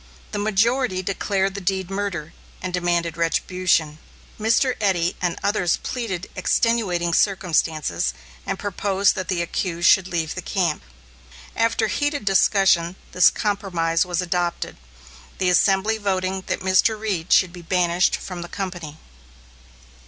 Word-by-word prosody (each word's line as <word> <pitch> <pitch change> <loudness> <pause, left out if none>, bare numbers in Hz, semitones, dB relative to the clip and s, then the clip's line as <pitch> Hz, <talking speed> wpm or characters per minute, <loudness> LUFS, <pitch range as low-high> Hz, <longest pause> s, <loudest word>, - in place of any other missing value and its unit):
The 205 - -3
majority 215 0 +1
declared 195 0 -1
the 200 - -6
deed 190 0 -2
murder, 195 -6 -3 0.3
and 185 0 -5
demanded 175 -2 0
retribution. 165 -2 0 0.4
Mr. 230 +4 +2
Eddy 180 -4 +1
and 175 -2 -1
others 200 -4 +1
pleaded 195 -8 -4
extenuating 185 -8 +1
circumstances 165 - +1 0.3
and - - -3
proposed 200 0 +1
that 185 -3 -5
the 175 -2 0
accused 170 0 -1
should 190 -1 +5
leave 165 -3 -2
the 185 - -5
camp. 175 -4 -1 0.7
After 230 0 +1
heated 290 +2 -1
discussion 195 -3 +3 0.2
this 180 -1 +6
compromise 175 -5 0
was 180 -1 -2
adopted, 175 -1 -2 0.6
the 185 - +1
assembly 195 +4 +3
voting 190 -2 -1
that - - -2
Mr. 190 +4 +2
Reed 195 -6 -3
should 180 -2 +4
be 175 - -9
banished 175 +1 +2
from 180 -2 -7
the 175 - -7
company. 175 -6 -6
185 Hz, 130 wpm, -22 LUFS, 175-200 Hz, 0.7 s, this